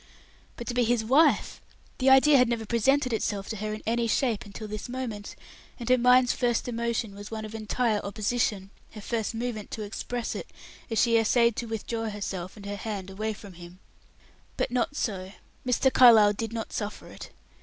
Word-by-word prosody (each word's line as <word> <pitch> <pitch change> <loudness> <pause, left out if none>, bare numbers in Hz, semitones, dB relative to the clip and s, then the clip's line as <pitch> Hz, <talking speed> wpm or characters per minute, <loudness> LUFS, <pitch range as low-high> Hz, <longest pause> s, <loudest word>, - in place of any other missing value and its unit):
But 235 - -6
to 245 - -3
be 245 0 +2
his 235 -1 +1
wife! 275 +8 +3 0.4
the 265 0 +4
idea 265 +3 +7
had 250 -1 +4
never 230 -2 -2
presented 255 +3 +2
itself 205 -2 -2
to 220 - -3
her 215 +1 -3
in 215 - -6
any 235 +1 0
shape 230 -1 0
until 205 +2 -8
this 215 +3 -6
moment, 240 -5 -5 0.4
and 235 - -6
her 255 - +6
mind's 250 0 +5
first 240 -1 0
emotion 235 -2 -2
was 205 +1 -9
one 220 -1 -5
of 215 - -9
entire 220 0 0
opposition, 205 -1 -1 0.2
her 215 - -9
first 225 +1 -2
movement 225 -3 -4
to 215 - -5
express 230 +3 -4
it, - - -6 0.4
as 225 - 0
she 230 -1 +4
essayed 235 +1 +3
to 235 - -3
withdraw 225 0 -3
herself 195 -2 -5
and 200 - -11
her 205 0 -4
hand 200 -3 -5
away 215 +3 -3
from 205 -2 -12
him. 175 +1 -12 0.8
But - - -1
not 250 +3 0
so; 190 -7 -3 0.3
Mr. 255 +2 +2
Carlyle 220 -5 +7
did 225 +1 -4
not 225 -1 -5
suffer 210 -1 -4
it. - - -10
225 Hz, 190 wpm, -27 LUFS, 210-240 Hz, 0.8 s, idea